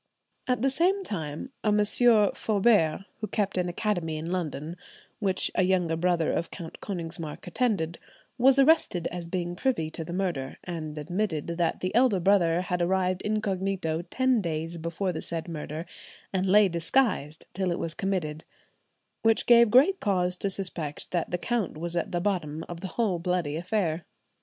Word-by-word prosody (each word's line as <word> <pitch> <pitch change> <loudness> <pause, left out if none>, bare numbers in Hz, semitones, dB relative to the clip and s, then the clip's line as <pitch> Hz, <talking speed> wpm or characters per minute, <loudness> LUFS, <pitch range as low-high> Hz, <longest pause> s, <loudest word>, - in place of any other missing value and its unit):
At 250 -1 0
the 270 - +3
same 370 +7 +2
time 160 - -5
a 210 - +3
Monsieur 210 +1 +4
Foubert, 200 -5 +2
who 215 - -3
kept 205 -1 -1
an 180 -1 0
Academy 175 -4 -1
in 165 +3 -4
London 165 -2 -3 0.4
which 190 -3 +1
a - - +2
younger 180 -3 +2
brother 170 -1 +1
of 170 - -1
Count 165 -4 -8
Konigsmark 165 -5 -5
attended, 195 -10 -1 0.4
was 265 +2 +6
arrested 275 - +4
as 175 -1 -5
being 175 0 -3
privy 175 -8 0
to 165 - -5
the 165 - -8
murder, 175 -8 -2
and 155 -4 -5
admitted 170 +1 -2
that 170 - 0
the 185 - -2
elder 235 -4 +4
brother 175 -2 +3
had 180 -1 -2
arrived 185 +1 +1
incognito 195 -6 -1
ten 260 -1 +2
days 165 -1 -3
before 170 +4 -2
the 160 - -4
said 165 0 -5
murder, 155 0 -5 0.5
and 190 0 +1
lay 205 +2 +6
disguised 170 - 0
till 190 -1 -1
it 170 - -1
was 165 - -3
committed, 165 -5 -2 0.8
which 225 -1 +3
gave 235 -1 +7
great 285 - +5
cause 180 -3 +1
to 200 - 0
suspect 175 -6 -4
that 175 -2 -1
the 180 - -1
count 220 -2 -2
was 170 +2 -3
at 170 - -1
the 175 - 0
bottom 170 -5 -2
of 170 -1 -7
the 190 - -4
whole 205 -7 +1
bloody 175 -4 -1
affair. 170 -2 -1
180 Hz, 170 wpm, -27 LUFS, 165-210 Hz, 0.8 s, gave